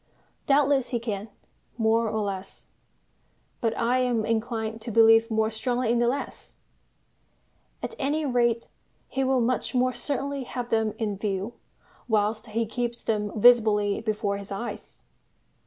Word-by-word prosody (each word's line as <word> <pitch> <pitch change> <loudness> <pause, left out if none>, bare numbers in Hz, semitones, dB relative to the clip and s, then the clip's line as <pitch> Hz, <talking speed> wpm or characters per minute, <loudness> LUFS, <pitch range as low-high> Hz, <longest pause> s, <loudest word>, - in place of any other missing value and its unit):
Doubtless 275 -2 +3
he 240 - -1
can, 215 -2 -4 0.5
more 225 0 +2
or 220 0 -1
less; 195 -2 -5 0.9
but 225 -1 -1
I 245 +2 +2
am 245 -4 +1
inclined 225 -1 -2
to 230 - -5
believe 225 +1 +6
more 220 0 +1
strongly 240 +1 0
in 235 - +2
the 240 - +3
less. 275 +4 -3 1.3
At - - -4
any 295 +2 0
rate 240 -3 +1 0.4
he 270 - -1
will 260 -1 +2
much 250 +2 0
more 255 0 +2
certainly 280 0 -2
have 245 -1 -5
them 220 -1 +1
in 210 -4 -2
view 200 +2 -2 0.5
whilst 220 0 0
he 225 +2 -1
keeps 240 +1 -3
them 210 -2 -1
visibly 215 -3 +5
before 215 -2 -1
his 200 0 -9
eyes. 215 +5 -6
230 Hz, 140 wpm, -26 LUFS, 215-245 Hz, 1.3 s, believe